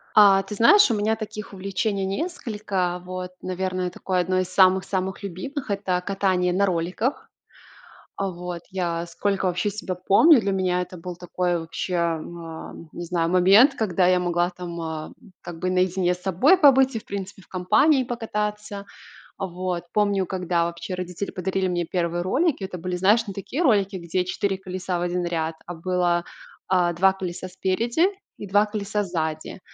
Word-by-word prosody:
А, 195 -2 +7
ты 200 +2 -8
знаешь, 235 - +6
у - - +2
меня 215 +1 +1
таких 215 -2 -7
увлечений 195 +1 -2
несколько. 200 - -2
Вот, 185 0 -6
наверное, 185 0 -2
такое 185 +1 -2
одно 185 +1 +1
из 185 - -1
самых-самых 190 +1 +2
любимых- 235 - -5
это 190 -3 0
катание 185 -2 +1
на 200 +2 +3
роликах. 180 - -2 0.9
А, 195 -1 -1
вот 175 -1 -6
я 175 -3 -2
сколько 195 +3 -1
вообще 180 +3 0
себя 195 -2 -4
помню, 250 - +6
для 200 -2 -1
меня 180 -1 +1
это 180 0 -9
был 175 0 -7
такой 180 0 -1
вообще, 165 +3 -4
а, 170 -2 0 0.7
не 175 - -6
знаю, 170 -1 0
момент, 195 +9 +6
когда 190 -7 +1
я 180 0 +4
могла 175 0 +1
там, 175 -1 -7
а, 160 -1 -5 0.3
как 175 -1 -8
бы 185 - 0
наедине 185 0 +2
с 180 - -14
собой 195 - +4
побыть 270 -4 +5
и, 225 - -1
в - - -15
принципе, 200 0 -6
в - - -22
компании 255 - +3
покататься. 210 -3 -4 0.5
Вот, 180 -1 -3
помню, 200 -2 +2
когда 180 -2 0
вообще 170 +2 -5
родители 180 +2 -4
подарили 190 +1 -1
мне 175 -1 0
1 170 0 -1
ролики, 260 - +1
это 185 -1 -5
были, 180 +1 -3
знаешь, 210 +5 +3
не 200 - -5
такие 220 - -4
ролики, 200 - +2
где 180 +1 -1
4 195 +1 -1
колеса 185 -1 -4
в - - -3
1 175 0 -1
ряд, 165 -2 -2
а 175 - -6
было, 175 0 0 0.5
а, 180 -2 +3
2 190 +3 +4
колеса 185 -1 -6
спереди 230 - +1 0.3
и 205 - -7
2 205 +2 +4
колеса 210 -1 -2
сзади. 160 -3 -3
185 Hz, 170 wpm, -24 LUFS, 180-200 Hz, 0.9 s, А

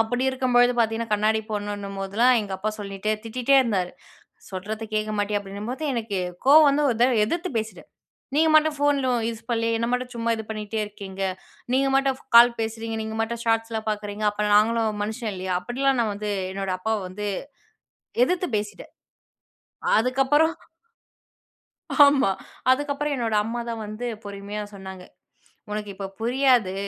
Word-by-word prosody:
அப்படி 245 +3 0
இருக்கும்பொழுது 250 -2 +3
பார்த்தீங்கன்னா, 225 -1 0
கண்ணாடி 215 +1 +2
போடணுன்னும் 205 -1 -4
போதுலாம், 225 +6 +3
எங்க 205 -2 -6
அப்பா 215 +3 -1
சொல்லிட்டே 200 +1 -2
திட்டிட்டே 250 +4 +2
இருந்தாரு. 190 -7 -1 0.6
"சொல்றத 210 +4 -5
கேட்க 215 0 0
மாட்டியா?" 205 0 0
அப்படீன்னும்போது, 205 +8 -6
எனக்கே 215 -5 -2 0.3
கோவம் 300 +1 +8
வந்து 295 +1 +1
ஒரு 230 - -1
தடவ 245 -2 +4
எதிர்த்து 345 - -2
பேசிட்டேன். 220 0 -6 0.5
"நீங்க 320 +1 +4
மட்டும் 310 0 +3
ஃபோன்லோ 280 -3 +2 0.2
யூஸ் 230 0 -6
பண்ணலயா? 230 -1 +1
என்ன 230 - -1
மட்டும் 250 0 -2
சும்மா 230 0 0
இது 220 - -6
பண்ணீட்டே 215 0 -3
இருக்கீங்க. 195 -2 -8 0.5
நீங்க 270 +1 +3
மட்டும் 270 -1 +1 0.2
கால் 235 0 +8
பேசுறீங்க. 225 0 -3
நீங்க 220 0 -5
மட்டும் 235 +1 -4
ஷார்ட்ஸ்லாம் 225 -1 0
பார்க்குறீங்க. 210 0 -4
அப்ப 210 0 -2
நாங்களும் 220 -1 +2
மனுஷன் 220 0 -4
இல்லையா?" 185 0 -3
அப்படிலாம் 265 +5 0
நான் 215 -2 -1
வந்து 210 +1 -4 0.2
என்னோட 195 -1 -3
அப்பாவ 220 +2 -1
வந்து 205 +3 -4 1.0
எதிர்த்து 360 +3 -1
பேசிட்டேன். 210 0 -6 1.1
அதுக்கப்புறம் 270 +7 +2 1.5
ஆமா. 275 -8 +4 0.4
அதுக்கப்பறம், 290 +2 0
என்னோட 230 -4 -1
அம்மா 235 +2 -3
தான் 225 -1 -4
வந்து 215 +4 -6 0.2
பொறுமையா 200 +1 -6
சொன்னாங்க, 190 -2 -9 0.7
"உனக்கு 210 0 -4
இப்ப 195 0 -5
புரியாது. 245 -5 +3
225 Hz, 145 wpm, -24 LUFS, 210-250 Hz, 1.5 s, கோவம்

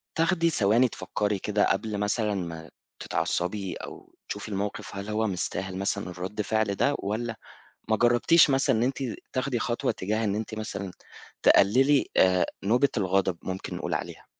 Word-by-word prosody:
تاخدي 165 0 +2
ثواني 115 -1 +3
تفكّري 105 -3 -2
كده 105 +1 +1
قبل 105 +1 -1
مثلًا 105 +1 0
ما 85 -3 -5 0.3
تتعصّبي 95 +2 -2
أو - - -10
تشوفي - - -5
المَوقِف 100 +1 -4
هل 100 +2 -5
هو 110 +1 0
مستاهل 95 0 -3
مثلًا 100 -1 -2
الرَد 95 +4 -4
فِعل 110 -1 0
ده؟ 145 +7 +2
والّا 110 +3 -3 0.5
ما 110 - +3
جرّبتيش 120 +8 +5
مثلًا 135 -4 +3
إن 110 - +1
أنتِ 130 +2 0 0.4
تاخدي 130 -1 -1
خطوة 120 +1 -1
تجاه 110 +4 -2
إن 100 -1 0
أنتِ 110 +1 -4
مثلًا، 100 -3 -5 0.5
تقللي 130 +8 +5
آآ 90 -1 +4 0.2
نوبة 125 +7 +3
الغضب 95 -2 +1
ممكن 95 0 -5
نقول - - -2
عليها؟ - - -6
105 Hz, 155 wpm, -27 LUFS, 95-120 Hz, 0.5 s, جرّبتيش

